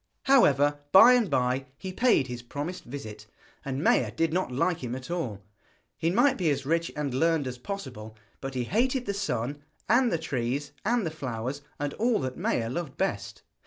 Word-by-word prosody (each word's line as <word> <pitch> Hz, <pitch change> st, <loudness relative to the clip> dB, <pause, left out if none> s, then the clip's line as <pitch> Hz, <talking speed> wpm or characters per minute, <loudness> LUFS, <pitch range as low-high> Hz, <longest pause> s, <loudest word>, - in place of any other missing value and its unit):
However, 145 Hz, -, +4 dB
by 225 Hz, +6 st, +9 dB
and 240 Hz, -6 st, +3 dB
by 130 Hz, +1 st, 0 dB
he 190 Hz, +3 st, -6 dB
paid 240 Hz, -, +3 dB
his 125 Hz, -2 st, -6 dB
promised 150 Hz, +9 st, -6 dB
visit, 110 Hz, -5 st, -8 dB, 0.4 s
and 135 Hz, +1 st, -3 dB
Maia 115 Hz, -, +3 dB
did 160 Hz, +7 st, 0 dB
not 180 Hz, -7 st, 0 dB
like 165 Hz, +7 st, 0 dB
him 125 Hz, 0 st, -3 dB
at 130 Hz, +5 st, -7 dB
all. 120 Hz, -, -3 dB, 0.5 s
He 165 Hz, -, 0 dB
might 245 Hz, +8 st, +3 dB
be 175 Hz, -4 st, +2 dB
as 140 Hz, -2 st, -1 dB
rich 165 Hz, +3 st, 0 dB
and 145 Hz, -3 st, -2 dB
learned 160 Hz, +1 st, +2 dB
as 125 Hz, -1 st, -5 dB
possible, 125 Hz, -, -7 dB, 0.2 s
but 135 Hz, 0 st, -6 dB
he 125 Hz, -, 0 dB
hated 250 Hz, -, 0 dB
the 200 Hz, -, -1 dB
sun, 145 Hz, -, -2 dB, 0.3 s
and 245 Hz, +1 st, +4 dB
the 170 Hz, -, +1 dB
trees, 140 Hz, -1 st, -2 dB
and 235 Hz, -1 st, +1 dB
the 160 Hz, -, -2 dB
flowers, 130 Hz, -2 st, -4 dB, 0.2 s
and 145 Hz, 0 st, -2 dB
all 235 Hz, 0 st, +1 dB
that 130 Hz, -1 st, -3 dB
Maia 115 Hz, -, 0 dB
loved 145 Hz, +2 st, -4 dB
best. 195 Hz, -, -3 dB
145 Hz, 190 wpm, -27 LUFS, 125-185 Hz, 0.5 s, by